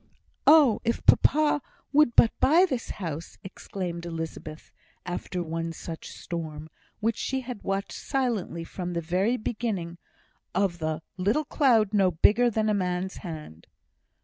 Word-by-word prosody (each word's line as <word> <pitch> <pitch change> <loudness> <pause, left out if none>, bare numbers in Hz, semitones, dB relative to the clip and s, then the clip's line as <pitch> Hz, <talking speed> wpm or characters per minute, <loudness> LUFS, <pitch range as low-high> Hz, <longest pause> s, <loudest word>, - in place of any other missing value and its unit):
"Oh! 295 -7 +7
if 235 0 -1
papa 300 0 +4 0.3
would 290 -5 +4
but 230 - +6
buy 335 +6 +5
this 260 -10 -3
house!" 165 -4 -6
exclaimed 180 -2 -6
Elizabeth, 160 -2 -7 0.3
after 180 0 -3
one 165 0 -3
such 165 0 -8
storm, 160 -2 -6 0.3
which 225 +1 +1
she 265 0 -2
had 250 -4 -7
watched 195 0 -2
silently 235 - -2
from 180 +1 -5
the 170 - -1
very 185 +9 +1
beginning 210 -7 -3 0.6
of 185 -2 +1
the 155 0 -2
"little 210 +12 +1
cloud 230 -9 +3
no 195 -3 +4
bigger 210 +8 +4
than 220 -1 0
a 215 - +2
man's 185 -1 -2
hand." 155 - -9
190 Hz, 140 wpm, -27 LUFS, 170-235 Hz, 0.6 s, Oh